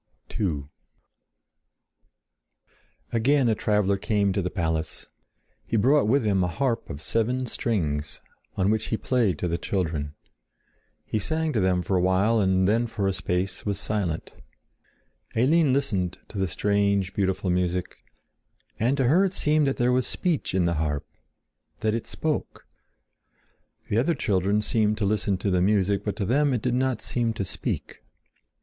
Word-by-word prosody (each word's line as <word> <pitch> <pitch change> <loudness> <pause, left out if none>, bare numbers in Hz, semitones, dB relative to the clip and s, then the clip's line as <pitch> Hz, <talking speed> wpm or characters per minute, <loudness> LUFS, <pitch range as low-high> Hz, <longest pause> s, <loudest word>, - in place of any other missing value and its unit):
II 80 -9 0 2.5
Again 130 +3 +3
a 115 - +3
traveler 105 -2 +1
came 100 -1 +1
to 100 - 0
the 90 - -2
palace. 80 -4 -2 0.6
He 115 - -1
brought 135 +3 +4
with 125 +1 +2
him 100 -3 +2
a - - +1
harp 120 +5 -1
of 70 +3 -7
seven 125 +3 0
strings, 80 - -2 0.4
on 95 +1 +2
which 110 -1 0
he 110 - -1
played 115 -8 +1
to 90 - -2
the 85 0 -1
children. 80 -6 -2 0.9
He 110 - -1
sang 160 +8 -1
to 110 - +1
them 90 -2 +2
for 95 - -1
a - - +2
while 95 +5 +3
and 95 -2 +2
then 115 +3 +2
for 105 -3 -2
a 95 - +1
space 90 +1 -2
was 100 -2 -2
silent. 95 -8 -2 1.0
Eline 145 +5 +4
listened 95 -10 0
to 100 - -6
the 95 - +1
strange, 100 +1 +1
beautiful 95 -1 0
music. 90 0 -1 0.8
And 125 +5 +2
to 135 - +2
her 155 +10 +4
it 190 0 -2
seemed 150 -1 +2
that 135 - 0
there 120 +1 +2
was 125 0 +1
speech 170 - -1
in 90 -2 +2
the 85 - +1
harp—that 75 +7 -5
it 115 - -3
spoke. 155 -1 -3 1.2
The 105 - +1
other 160 +7 +1
children 100 -3 +1
seemed 105 -1 +1
to 105 - 0
listen 100 -1 +1
to 100 +1 -1
the 90 -1 +2
music, 100 0 +2
but 105 - -2
to 100 - -2
them 140 +6 +2
it 115 - -3
did 125 -1 +1
not 130 0 0
seem 115 -2 0
to 100 - -3
speak. - - -4
105 Hz, 160 wpm, -25 LUFS, 95-120 Hz, 2.5 s, brought